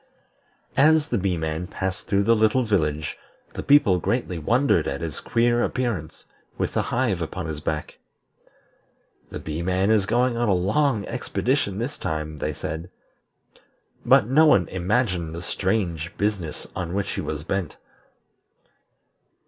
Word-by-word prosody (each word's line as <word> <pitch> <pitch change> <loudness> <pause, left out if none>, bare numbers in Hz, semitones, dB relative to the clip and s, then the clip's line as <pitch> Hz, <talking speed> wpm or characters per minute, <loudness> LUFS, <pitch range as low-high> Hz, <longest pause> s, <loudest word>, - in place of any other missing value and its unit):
As 155 +1 +5
the 120 - 0
Bee 95 -2 0
man 80 +2 -3
passed 95 -1 -4
through 100 0 +2
the 115 +3 +4
little 110 +4 +3
village 80 -8 -1 0.3
the - - -4
people 140 -11 +5
greatly 95 -3 -1
wondered 120 - +2
at 70 - -2
his 80 -4 -4
queer 120 0 +2
appearance, 105 -12 -3 0.3
with - - -1
the - - +2
hive 115 -8 0
upon 85 +2 -4
his 80 -2 -4
back. 75 0 -4 1.3
"The - - -6
Bee 80 +1 -5
man 95 +3 +1
is 105 -3 +3
going 120 +2 +2
on 120 -1 +1
a 95 - +4
long 105 +5 +1
expedition 125 -3 -1
this 125 +6 -4
time," 75 -1 -3
they 75 - -2
said; 80 +3 -5 1.1
but - - +5
no 150 +7 +5
one 100 - +4
imagined 90 -3 0
the 85 - -6
strange 90 -3 -1
business 100 -7 -2
on 85 0 -3
which 100 -1 -1
he - - -3
was 75 -1 -4
bent. 90 -1 -3
95 Hz, 150 wpm, -24 LUFS, 80-120 Hz, 1.3 s, As